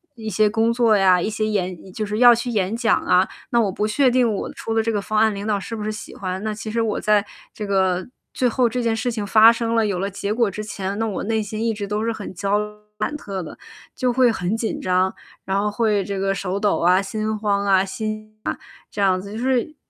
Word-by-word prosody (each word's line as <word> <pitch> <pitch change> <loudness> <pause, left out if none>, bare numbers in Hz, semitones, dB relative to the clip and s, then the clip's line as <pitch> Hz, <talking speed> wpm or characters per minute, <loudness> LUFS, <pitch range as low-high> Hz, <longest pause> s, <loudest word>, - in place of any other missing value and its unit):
一 220 -2 -6
些 215 +1 +3
工 225 +2 +2
作 230 -2 +3
呀， 185 -3 +4
一 - - -1
些 215 0 -1
演 185 -3 -3
就 215 +3 -3
是 210 +2 -3
要 245 -1 +9
去 235 +2 -2
演 205 -3 0
讲 230 -1 +2
啊， 180 +1 +3 0.2
那 235 - +2
我 215 -4 +2
不 210 +3 -2
确 255 +5 +3
定 245 -3 +2
我 200 - -4
出 225 - -4
的 225 - +3
这 225 0 -1
个 205 - 0
方 215 +1 -1
案 220 -1 +3
领 200 +1 -5
导 210 -2 0
是 225 +4 -6
不 215 - -5
是 215 - -2
喜 215 - -8
欢。 185 0 -4
那 215 - -1
其 215 0 -6
实 230 - 0
我 220 -2 -1
在 210 -1 +3 0.3
这 210 - -5
个 190 -2 +1 0.3
最 255 - +1
后 245 +1 +2
这 250 +2 -2
件 230 -1 +1
事 245 +2 -1
情 215 -3 -3
发 220 +2 +7
生 230 0 -2
了， 225 -1 +3
有 200 -3 -1
了 195 +2 -1
结 200 +1 -4
果 230 -1 +2
之 215 - -5
前， 200 -2 -4
那 225 - +1
我 205 - -3
内 220 +1 0
心 215 +1 -4
一 230 - +1
直 205 -1 -5
都 210 +1 -2
是 230 - 0
很 210 -3 -7
焦 200 +3 0
虑 210 - -1
忐 - - -9
忑 210 - -22 0.2
的， - - +1 0.9
就 250 -1 0
会 250 -1 +4
很 190 -1 -2
紧 225 0 -2
张。 185 0 +2 0.3
然 195 +1 0
后 210 +1 0
会 210 -2 +1
这 200 0 -4
个 195 0 +1
手 195 0 -3
抖 205 -1 +2
啊、 180 +3 +4
心 215 +2 -3
慌 200 -1 0
啊、 190 -1 +4
心 215 +2 -5
悸 - - -1
啊 - - -5 0.4
这 205 - -4
样 190 -2 +3
子， 200 +1 -9
就 - - -5
是 260 +4 0
215 Hz, 285 characters per minute, -22 LUFS, 195-225 Hz, 0.9 s, 要